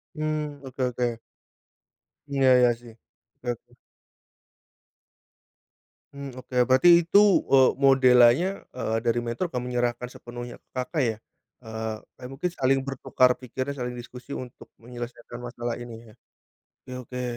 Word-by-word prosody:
Mmm, 150 -2 -3
oke 130 0 -4
oke. 120 -2 -2 1.1
Iya 140 -1 -1 0.2
iya 125 -1 +6
sih. 120 -1 -13 0.4
Oke 125 - -15
oke. - - -18 2.4
Mmm, 135 -2 -8
oke, 125 - -11
berarti 130 +7 +5 0.2
itu, 200 +4 +5 0.3
eee, 130 -1 +7 0.2
modelannya, 130 +4 +6 0.2
eee, 115 -3 -1
dari 120 0 +2
mentor 120 +9 -2
akan 125 - -1
menyerahkan 120 0 -1
sepenuhnya 120 -1 -9
ke - - -45
Kakak 130 +4 -2
ya? 110 -2 -1 0.4
Eee 110 -1 -5 0.2
eee, 125 - -8
mungkin 165 +7 -2
saling 135 -4 +1
bertukar 130 -1 +1
pikiran, 130 +3 -5
saling 125 -1 -3
diskusi 125 +2 -9
untuk 125 -2 -9
menyelesaikan 120 0 -8
masalah 120 -1 -5
ini 115 -1 -10
ya. 105 - -16 0.7
Oke 130 - -11
oke. 125 0 -5
125 Hz, 130 wpm, -26 LUFS, 120-135 Hz, 2.4 s, eee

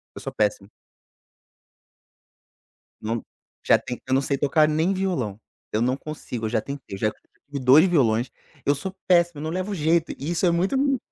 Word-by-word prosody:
S - - -12
eu - - -7
sou - - -6
péssimo. 100 -1 0 2.3
Não, 115 +1 -2 0.4
já - - +6
tentei, 125 -1 -7
eu 130 - 0
não 135 - +4
sei 140 0 -1
tocar 150 +2 +3
nem 160 +5 +1
violão, 165 - -2 0.3
eu 110 - 0
não 125 +2 +2
consigo, 135 -6 -6
eu - - -1
já 110 -1 0
tentei, 140 -6 -7
eu - - -9
já 110 - +1
tive 140 +5 -11
2 135 +7 +7
violões, 125 -8 +2 0.4
eu 145 - +3
sou 185 +7 -5
péssimo, 175 -3 +3
não 155 - -3
levo 185 +4 -3
jeito 165 -1 +1
e 150 +5 -4
isso 175 - +1
é 175 - +4
muito, 180 +8 +1
m 265 - +3
m - - -20
145 Hz, 195 wpm, -24 LUFS, 120-170 Hz, 2.3 s, 2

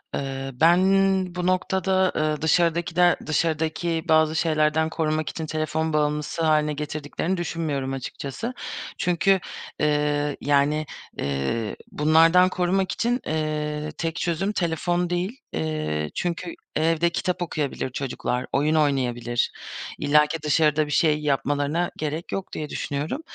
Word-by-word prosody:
Eee, 135 -1 -4
ben 165 +7 +5 0.6
bu 180 0 -1
noktada, 190 0 +2
eee, 155 -1 0
dışarıdakiler 170 +2 +3
dışarıdaki 160 +1 0
bazı 160 0 +4
şeylerden 160 -1 +2
korumak 155 -1 -1
için 160 - -5
telefon 155 +1 -1
bağımlısı 150 +1 0
hâline 150 -1 +3
getirdiklerini 150 +4 -3
düşünmüyorum 150 -5 -2
açıkçası. 140 - -5 0.4
Çünkü, 185 +2 +2 0.4
eee, 150 -1 +1
yani, 145 +2 +2 0.3
eee, 70 +11 -2 0.2
bunlardan 165 +4 +5
korumak 185 +1 0
için, 245 +2 0
eee, 150 -1 -2
tek 165 -1 -2
çözüm 175 +3 -1
telefon 175 -1 0
değil. 185 +9 -2
Eee, 75 -1 -2
çünkü 175 0 -2 0.2
evde 165 +2 +2
kitap 180 +1 -2
okuyabilir 150 -6 -2
çocuklar, 130 -1 -3
oyun 150 +3 +2
oynayabilir. 125 -5 +1 0.5
İllaki 150 +2 +3
dışarıda 150 0 +3
bir 150 - -7
şey 150 0 +3
yapmalarına 145 +3 0
gerek 155 +2 -4
yok 195 - -4
diye 150 -1 -4
düşünüyorum. 145 - -3
155 Hz, 120 wpm, -24 LUFS, 145-170 Hz, 0.6 s, ben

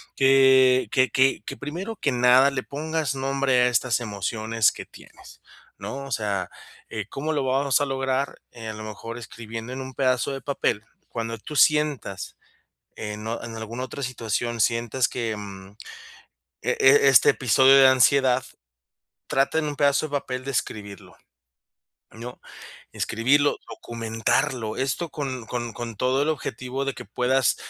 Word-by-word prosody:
que 130 -1 +5
que 130 -1 +3
que 130 +3 +2
que - - -6
primero 180 +10 -5
que 140 - 0
nada, 125 +3 +5
le 130 -2 -3
pongas 155 -1 -3
nombre 135 -1 +1
a - - +4
estas 125 0 +1
emociones 110 0 0
que - - -9
tienes, - - -16 0.4
¿no? 140 +1 -6
O 135 - -10
sea, 100 -5 -2 0.4
eh, 105 -2 -5
¿cómo 155 +3 -3
lo 145 -3 0
vamos 135 +1 +1
a - - +2
lograr?, 135 0 -2
eh, 115 -2 -8
a - - -4
lo 110 0 -8
mejor, 115 +2 -7
escribiendo 115 +1 -8
en 130 - -5
un 130 0 -8
pedazo 130 0 +1
de 135 0 -5
papel, 115 -6 -1 0.2
cuando 115 0 -4
tú 150 +7 -7
sientas 150 - +1 0.6
en 105 0 -6
o 115 +1 -3
en 115 -1 -7
alguna 115 +3 -5
otra 140 +2 -7
situación 120 -1 -3
sientas 115 +2 +1
que, 115 -3 -3
mm, 100 -1 -10 0.9
e - - -1
e 140 +1 +6
este 130 -5 +7
episodio 130 +2 +4
de 135 -1 +8
ansiedad, 130 0 +4 0.9
trata 135 +4 +1
en 160 - 0
un 145 -1 -4
pedazo 140 +2 +2
de 150 - -13
papel, 130 -1 -6
de 135 - -4
escribirlo, 105 -5 -5 1.0
¿no? 120 +2 -9 0.5
Escribirlo, 140 +6 +2
documentarlo, 115 0 -2
esto 140 +5 -2
con 130 -5 -5
con 120 0 -4
con 115 -1 -7
todo 130 +5 +1
el 150 - 0
objetivo 130 -2 -4
de 135 -1 -2
que 125 - -9
puedas 125 +4 +1
130 Hz, 160 wpm, -24 LUFS, 115-135 Hz, 1.0 s, de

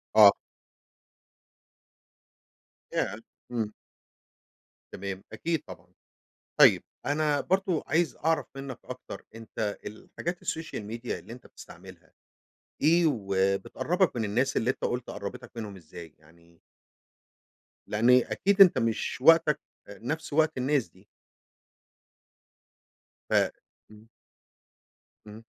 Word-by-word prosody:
آه. 105 -2 +10 2.6
ياه 100 - 0 0.4
امم. 110 -3 -2 1.2
تمام 95 0 -5
أكيد 165 -2 -2
طبعًا، - - -12 0.7
طيب - - +7 0.2
أنا 145 0 +1
برضه 190 -3 0
عايز 165 +2 +1
أعرف 165 0 +2
منك 135 -2 -7
أكتر 125 0 -9
أنتَ 110 -2 -4
الحاجات 170 - -6
الsocial 160 -8 -4
media 120 +1 -5
اللي 115 - -6
أنتَ 125 - -13
بتستعملها، - - -14 0.7
إيه، 170 +3 +5
وبتقربك 100 - 0
من 110 - 0
الناس 125 +6 0
اللي 120 +3 +2
أنتَ - - -4
قلت 120 0 -2
قرَّبتك 100 - -7
منهم 105 -4 -6
إزاي 80 -2 -12
يعني؟ 85 +2 -23 1.3
لأن 110 +4 +2
أكيد 195 - +4
أنتَ 185 - +8
مش 115 -1 -1
وقتَك 160 0 +6 0.3
آآ 100 -1 -11
نفس 150 +4 -4
وقت 155 -2 +2
الناس 135 -1 +1
دي. 95 +3 -23 2.2
ف - - -2 0.6
امم. 110 +1 -17 1.2
امم. 110 +2 -11
120 Hz, 105 wpm, -28 LUFS, 105-155 Hz, 2.6 s, آه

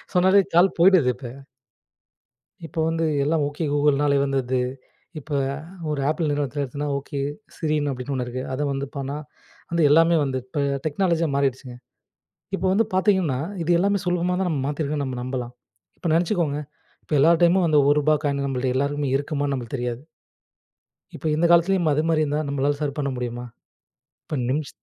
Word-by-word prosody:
சொன்னாலே 190 +2 +5
கால் 180 +2 +5
போயிடுது 175 -8 +5
இப்ப. 130 - -11 1.4
இப்போ 160 - -6
வந்து 165 0 0 0.2
எல்லாம், 155 0 +1
ஓகே 150 +2 -4
கூகுள்னாலயே 145 -1 +3
வந்துர்து. 130 -2 0 0.6
இப்ப 150 - -13 0.6
ஒரு 145 - -1
ஆப்பிள் 155 0 0
நிறுவனத்தில 145 0 -1
எடுத்தனா 140 +3 -4
"ஓகே, 140 0 -6 0.4
சிரின்னு" 150 -3 0
அப்படின்னு 130 +1 -5
ஒண்ணு 130 -1 -1
இருக்கு 130 +1 -4
அத 130 - -3
வந்து 135 0 -3
பண்ணா 140 +1 -3 0.5
வந்து 170 -1 +1
எல்லாமே 165 +2 +5
வந்து 135 -2 -1
இப்ப 130 +3 -4 0.2
டெக்னாலஜியா 165 +1 +1
மாரிட்ச்சுங்க 135 -2 -1 0.8
இப்ப 190 - -2
வந்து 225 +4 +3
பாத்தீங்கன்னா 185 -8 +2 0.2
இது 170 - -2
எல்லாமே 200 +2 +2
சுலபமா 180 0 0
தான் 190 -1 0
நம்ம 140 -5 -1
மாத்திருக்கோன்னு 145 0 -2
நம்ம 130 -2 -4
நம்பலாம் 125 -1 -4 0.5
இப்ப 175 - -6
நெனச்சுக்கோங்க 165 -4 +1 0.4
இப்ப - - -13
எல்லா 160 +5 +6
டைமும் 175 +1 +4
அந்த 150 - +4
ஒருபா 150 +1 +3
காயின் 140 -1 0
நம்மள்ட்ட 130 -1 -1
எல்லாருக்குமே 140 0 -1
இருக்குமான்னு 145 0 -2
நம்பளுக்கு 125 +1 -4
தெரியாது. 120 0 -3 1.1
இப்ப - - -10
இந்த 165 +3 +2
காலத்திலயும் 175 0 +4
அது 150 - +2
மாரி 155 -1 +2
இருந்தா 150 +1 -1
நம்பளால 140 +1 0
சர் 140 -2 -2
பண்ண 140 -2 -1
முடியுமா? 120 0 -4 0.8
இப்ப 150 - -4
நிம்ஷ 145 +1 -1
145 Hz, 155 wpm, -23 LUFS, 135-165 Hz, 1.4 s, எல்லா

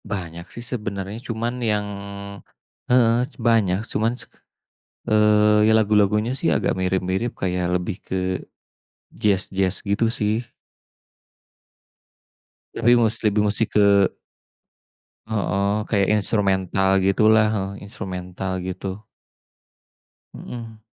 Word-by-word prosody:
Banyak 85 -4 -6
sih, 120 - -9
sebenarnya 105 -2 -5
cuman 120 +1 -3
yang 105 -3 0 1.0
heeh, 120 -1 +4
cu - - -16
banyak 115 -6 +2
cuman, 115 +1 0 1.0
eee, 105 0 +4
ya 110 - +5
lagu-lagunya 105 +1 +3
sih, - - +1
agak - - 0
mirip-mirip 95 +4 -1
kayak 90 -1 -1
lebih 90 +2 -2
ke 95 - -3 1.0
jaz-jaz, 95 -2 0
gitu 100 +3 +1
sih. 110 -1 0 2.3
Tapi 120 +1 +4
mus 115 -2 +2
lebih 105 -1 +2
musti 105 +1 +1
ke 100 -2 +4 1.2
Heeh, 100 -2 0 0.2
kayak 100 -3 +2
instrumental 95 -2 +1 0.2
gitulah 110 +3 +4
heeh, 95 -2 -2
instrumental 95 -3 -6 0.2
gitu. 95 +2 -5 1.3
Mhm. 115 -2 -9
105 Hz, 95 wpm, -22 LUFS, 95-110 Hz, 2.3 s, ya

